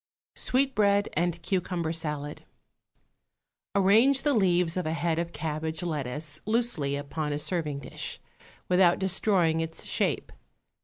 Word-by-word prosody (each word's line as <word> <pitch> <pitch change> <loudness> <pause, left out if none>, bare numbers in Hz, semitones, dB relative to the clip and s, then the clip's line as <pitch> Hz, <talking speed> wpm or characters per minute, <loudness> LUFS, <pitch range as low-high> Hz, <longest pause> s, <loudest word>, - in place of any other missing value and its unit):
_ - - -7
=Sweetbread 210 -7 +2
and 175 +1 0
Cucumber 175 -3 -1
Salad.= 150 -2 -3 1.3
Arrange 220 +8 +5
the 290 - +3
leaves 180 -6 +2
of 180 -3 -1
a 160 - 0
head 165 0 0
of 170 0 -3
cabbage 155 +1 -3
lettuce 150 -2 -4
loosely 215 -12 0
upon 150 +1 -3
a 145 - -1
serving 150 -3 -2
dish, - - -6 0.5
without 180 -1 +4
destroying 190 -3 +2
its 165 0 -5
shape. - - -1
170 Hz, 125 wpm, -28 LUFS, 155-195 Hz, 1.3 s, Arrange